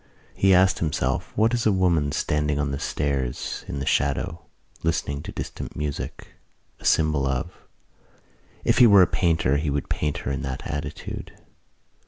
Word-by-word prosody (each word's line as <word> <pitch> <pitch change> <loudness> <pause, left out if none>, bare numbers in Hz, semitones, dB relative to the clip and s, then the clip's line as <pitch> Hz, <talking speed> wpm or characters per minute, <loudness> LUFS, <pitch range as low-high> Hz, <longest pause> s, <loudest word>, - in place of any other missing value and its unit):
He 95 - +3
asked 95 +1 +4
himself 75 -3 -1
what 110 +3 +3
is 120 -2 +1
a - - +5
woman 85 -6 +2
standing 75 0 0
on 75 -1 -1
the 70 - -3
stairs 70 -4 -2
in 70 - -4
the 70 - -3
shadow, 80 +4 0 0.4
listening 70 -3 -1
to - - -7
distant - - -6
music, 75 -1 -5 0.5
a - - -14
symbol 75 -3 +3
of. 65 -1 -2 1.1
If - - +2
he 125 - +9
were 100 -3 +8
a - - +6
painter 80 -7 +1
he 75 +1 -1
would 70 0 -2
paint 75 -1 -1
her - - -1
in 70 - -2
that 65 0 -5
attitude. 75 -2 -6
75 Hz, 165 wpm, -24 LUFS, 70-85 Hz, 1.1 s, he